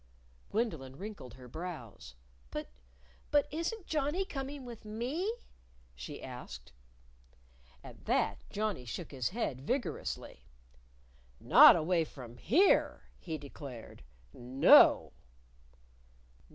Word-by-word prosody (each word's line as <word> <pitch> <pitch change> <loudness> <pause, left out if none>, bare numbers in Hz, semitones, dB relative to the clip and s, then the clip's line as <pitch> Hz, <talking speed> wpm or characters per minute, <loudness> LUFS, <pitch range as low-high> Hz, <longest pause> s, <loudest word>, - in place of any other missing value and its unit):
Gwendolyn 160 - -2
wrinkled 190 - -9
her 125 -1 -13
brows. 125 - -8 0.3
"But - - -6 0.6
but 290 -1 +3
isn't 345 +6 -3
Johnnie 305 +5 -1
coming 275 -3 -6
with 235 -2 -10
me?" 250 - -2 0.6
she - - -9
asked. 60 0 -9 1.1
At - - -13
that - - 0
Johnnie 210 -11 -3
shook 155 +8 -6
his 130 -4 -2
head 180 - -3
vigorously. 190 - -4 0.9
"Not - - +8
away 165 +1 +1
from 125 -6 -11
here," 340 - +3 0.2
he 160 -3 -5
declared. 140 -4 -10 0.3
"No!" 125 +2 +5
175 Hz, 100 wpm, -32 LUFS, -, 1.1 s, Not